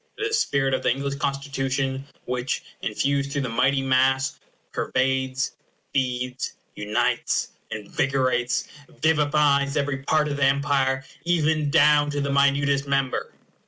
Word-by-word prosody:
It -, -, -4 dB
is 430 Hz, -, 0 dB
the -, -, -6 dB
spirit 135 Hz, -, +1 dB
of -, -, 0 dB
the -, -, +1 dB
English 140 Hz, +2 st, -1 dB
Constitution 135 Hz, -1 st, -2 dB, 0.2 s
which, 125 Hz, 0 st, -2 dB, 0.2 s
infused 140 Hz, 0 st, -1 dB
through 140 Hz, -1 st, -1 dB
the 125 Hz, -, -2 dB
mighty 135 Hz, +4 st, +2 dB
mass, 130 Hz, +1 st, +2 dB, 0.3 s
pervades, 130 Hz, 0 st, 0 dB, 0.4 s
feeds, 125 Hz, -1 st, -2 dB, 0.2 s
unites, 120 Hz, +4 st, 0 dB, 0.2 s
invigorates, 130 Hz, +2 st, 0 dB, 0.2 s
vivifies 150 Hz, -2 st, +2 dB
every 140 Hz, -1 st, 0 dB
part 150 Hz, +2 st, +2 dB
of 145 Hz, -1 st, -3 dB
the 145 Hz, -, 0 dB
Empire, 135 Hz, -1 st, +1 dB, 0.2 s
even 160 Hz, -3 st, +1 dB
down 150 Hz, -1 st, +5 dB
to 145 Hz, 0 st, -2 dB
the 140 Hz, 0 st, -1 dB
minutest 140 Hz, 0 st, +2 dB
member. 140 Hz, -2 st, 0 dB
140 Hz, 130 wpm, -24 LUFS, 130-145 Hz, 0.4 s, down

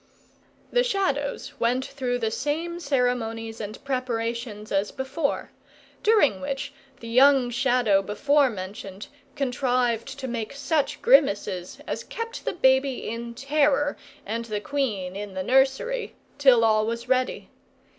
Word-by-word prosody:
The -, -, +3 dB
Shadows 375 Hz, -, -1 dB
went 250 Hz, +3 st, +1 dB
through 250 Hz, -3 st, -2 dB
the 225 Hz, -2 st, -1 dB
same 325 Hz, +7 st, -2 dB
ceremonies 245 Hz, -6 st, -1 dB
and 215 Hz, +2 st, -6 dB
preparations 235 Hz, -4 st, -3 dB
as 200 Hz, +1 st, +1 dB
before; 280 Hz, +3 st, -2 dB, 0.5 s
during 410 Hz, -, +3 dB
which, 275 Hz, -1 st, -4 dB, 0.3 s
the 230 Hz, -, -8 dB
young 255 Hz, +1 st, +5 dB
Shadow 245 Hz, -5 st, +3 dB
before 280 Hz, +8 st, +2 dB
mentioned 195 Hz, -1 st, -7 dB, 0.3 s
contrived 245 Hz, -4 st, 0 dB
to 265 Hz, -1 st, -5 dB
make 235 Hz, -2 st, -4 dB
such 290 Hz, +1 st, -1 dB
grimaces 200 Hz, -, +3 dB
as -, -, -4 dB
kept 460 Hz, +1 st, -6 dB
the -, -, -1 dB
baby 265 Hz, -4 st, +2 dB
in 235 Hz, +1 st, -5 dB
terror, 290 Hz, +2 st, +2 dB, 0.3 s
and 230 Hz, +3 st, -3 dB
the 215 Hz, -2 st, -3 dB
queen 210 Hz, -8 st, -2 dB
in 200 Hz, -1 st, -6 dB
the 190 Hz, -, -2 dB
nursery, 270 Hz, -, +1 dB, 0.2 s
till 255 Hz, -5 st, +6 dB
all 215 Hz, -1 st, +3 dB
was 230 Hz, +1 st, -3 dB
ready. 255 Hz, 0 st, 0 dB
250 Hz, 130 wpm, -25 LUFS, 225-280 Hz, 0.5 s, till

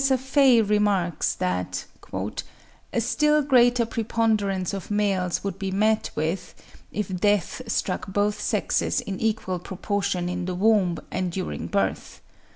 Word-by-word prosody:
Prof. 265 Hz, -2 st, +3 dB
Faye 265 Hz, -3 st, +4 dB
remarks 205 Hz, -5 st, +1 dB
that 90 Hz, 0 st, -2 dB, 1.1 s
"a -, -, 0 dB
still 300 Hz, +6 st, +2 dB
greater 245 Hz, -3 st, +4 dB
preponderance 215 Hz, -5 st, 0 dB
of 195 Hz, -2 st, -5 dB
males 195 Hz, -4 st, 0 dB
would 195 Hz, -1 st, -4 dB
be 195 Hz, -1 st, -2 dB
met 215 Hz, +3 st, +1 dB
with, 160 Hz, +4 st, -2 dB, 0.4 s
if 200 Hz, -3 st, -3 dB
death 205 Hz, 0 st, +1 dB
struck 180 Hz, -, -1 dB
both 205 Hz, +2 st, 0 dB
sexes -, -, 0 dB
in 195 Hz, -2 st, -5 dB
equal 215 Hz, -5 st, -1 dB
proportion 195 Hz, 0 st, -2 dB
in 180 Hz, 0 st, -3 dB
the 185 Hz, 0 st, -3 dB
womb 195 Hz, -3 st, +3 dB
and 185 Hz, -1 st, -1 dB
during 185 Hz, +1 st, -4 dB
birth. 200 Hz, -, -2 dB
200 Hz, 135 wpm, -25 LUFS, 180-220 Hz, 1.1 s, Faye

